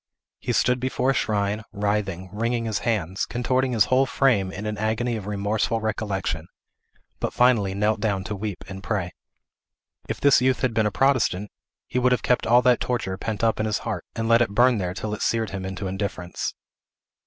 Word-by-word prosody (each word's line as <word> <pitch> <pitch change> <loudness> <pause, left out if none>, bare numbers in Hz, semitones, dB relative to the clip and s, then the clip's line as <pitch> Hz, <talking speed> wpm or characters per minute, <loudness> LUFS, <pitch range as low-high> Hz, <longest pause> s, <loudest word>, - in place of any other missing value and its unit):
He - - -2
stood 125 +1 +2
before 130 +1 0
a - - +1
shrine, 105 -3 0
writhing, 100 -3 -2
wringing 115 +2 -1
his 110 -3 -1
hands, 95 -6 -1
contorting 130 +2 0
his 110 -4 +4
whole 130 +1 +3
frame 115 -9 +2
in 105 +2 -6
an 105 0 -2
agony 115 +3 0
of 105 -3 -6
remorseful 105 +2 0
recollection, 100 -6 -2 0.7
but - - -2
finally 115 -6 +3
knelt 105 +2 +1
down 100 -3 0
to 105 +2 -4
weep 100 -1 -5
and 95 0 -7
pray. 95 -4 -2 1.0
If - - -3
this 140 -4 +5
youth 130 0 +2
had 130 -3 +1
been 110 -1 +2
a - - -1
Protestant, 115 -7 +1 0.3
he 125 - -1
would 125 0 +3
have 125 - -1
kept 125 - +1
all 120 +2 +5
that 125 -1 +4
torture 115 -7 -2
pent 110 0 -3
up 115 -1 +2
in 110 - 0
his 105 - 0
heart, - - -3
and 115 0 -2
let 115 +1 +5
it 120 - +2
burn 120 -1 +4
there 90 -1 -3
till 105 +3 -4
it 105 - -5
seared 115 -2 0
him 95 -1 -4
into 95 +1 -5
indifference. 95 -2 -3
110 Hz, 200 wpm, -24 LUFS, 100-120 Hz, 1.0 s, this